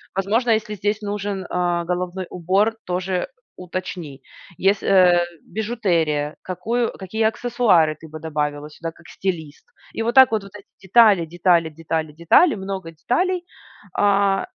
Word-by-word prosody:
Возможно, 220 +5 +1
если 215 -1 0
здесь 205 +2 -1
нужен, 205 -2 -4
а, 175 -1 0
головной 180 +1 -3
убор, 190 +5 +1
тоже, 185 +1 -2
э, 180 - 0 0.3
уточни. 180 -5 -6 0.4
Ес 195 +1 +2
э, 180 -2 +5 0.3
бижутерия, 170 -10 0
какую, 230 +6 -1
какие 205 +4 -3
аксессуары 220 -8 +2
ты 160 - -13
бы 155 +1 -8
добавила 150 -2 -3
сюда 165 +2 -6
как 170 +1 -19
стилист? 160 -6 -5 0.3
И - - +1
вот 235 +1 0
так 260 -3 +8
вот, 220 -2 0
вот 200 - -12
эти 205 - -12 0.2
детали, 200 -3 +5
детали, 170 0 +2
детали, 160 0 -3
детали, 170 - +4
много 190 -3 -5
деталей. 350 - -1 0.6
А, 200 -1 +3
185 Hz, 145 wpm, -21 LUFS, 170-210 Hz, 0.6 s, так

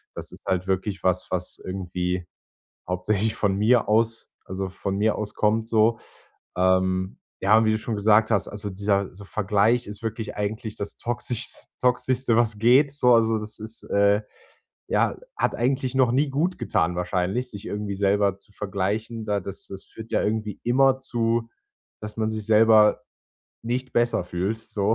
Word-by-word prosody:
Das - - -8
ist - - -12
halt 95 0 -1
wirklich 95 +1 -1
was, 90 -1 0
was 90 0 -3
irgendwie 90 -1 -3 0.6
hauptsächlich 100 +4 0
von 100 -2 0
mir 110 +3 +3
aus 115 +1 +1
also 95 +1 -4
von 95 +1 -4
mir 105 +1 +2
aus 105 -1 -5
kommt 110 +1 +1
so. 115 0 +3 0.6
Ähm, 95 0 +1 0.2
ja, 110 +3 +5
wie 110 - +3
du 110 - +1
schon 110 +1 -4
gesagt 105 +1 +4
hast, 100 -3 +1
also 105 0 -5
dieser 100 0 -1
so 100 +2 -12
Vergleich 105 +4 +1
ist 105 +1 -9
wirklich 115 0 -4
eigentlich 105 +1 -3
das 100 - -6
toxischs 120 0 -4
toxischste, 125 0 +1
was 115 -3 +1
geht 125 +6 +5
so 125 -4 +4
also, 115 -1 +3
das 105 0 -9
ist, 110 +1 -9
äh 100 +1 +3 0.7
ja, - - +1 0.2
hat - - 0
eigentlich 130 +1 0
noch 130 -3 +4
nie 140 +4 +2
gut 160 +7 0
getan, 85 +2 0
wahrscheinlich, 90 +7 -1
sich 100 -4 -9
irgendwie 105 -1 -4
selber 100 0 +2
zu 105 - -19
vergleichen. 105 +3 -3
Da 105 -1 0
das 100 0 -8
das 95 0 -9
führt 110 0 -11
ja - - +2
irgendwie 105 -1 -2
immer 130 +2 +3
zu, 115 -2 -1 0.5
dass 105 0 -7
man 110 -1 0
sich 110 -1 -4
selber 110 0 +5 0.6
nicht 125 +2 -3
besser 120 -6 +1
fühlt, 90 +5 -2
so, 110 -1 -1
105 Hz, 170 wpm, -24 LUFS, 100-115 Hz, 0.7 s, ja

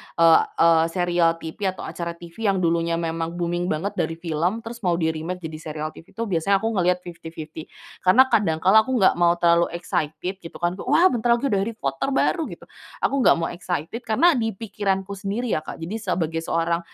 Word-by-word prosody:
eee 165 -1 +6 0.2
eee, 165 -1 +5
serial 175 -1 +1
TV 165 +4 -5
atau - - -8
acara 170 -1 -5
TV 175 +6 -5
yang 190 -2 +1
dulunya 170 0 +1
memang 165 0 -3
booming 175 0 -1
banget 180 +5 -1
dari 165 - -1
film, 170 +6 -2
terus 235 +1 -8
mau 180 -6 +1
di-remake 165 +2 -2
jadi 160 -1 -6
serial 155 -1 -5
TV 165 - -16
itu 230 - -2
biasanya 195 0 +1
aku 225 - +1
ngelihat 180 -3 +1
fifty-fifty, 160 -2 -9 0.3
karena 185 +8 +6
kadang 160 -7 +1
kala 195 +4 +7
aku 260 - 0
enggak 190 -6 +3
mau 170 0 +4
terlalu 170 0 +3
excited 175 +1 -3
gitu, 165 - -11
kan, 175 +2 -2
"Wah, 365 +3 +4
bentar 235 0 +2
lagi 255 +2 -2
ada 200 - +2
Harry 215 +3 -2
Potter 135 - -2
baru." 325 +2 +1
Gitu. - - -10 0.4
Aku 275 - +1
nggak 255 - +5
mau 165 -1 -2
excited 175 +3 -4
karena 325 +11 +4
di 225 - -1
pikiranku 195 -2 -2
sendiri, 205 +4 -3
ya, - - +1
Kak, 155 - -8
jadi 180 +7 -4
sebagai 170 -5 -1
seorang 165 +1 0
175 Hz, 200 wpm, -23 LUFS, 165-200 Hz, 0.4 s, kala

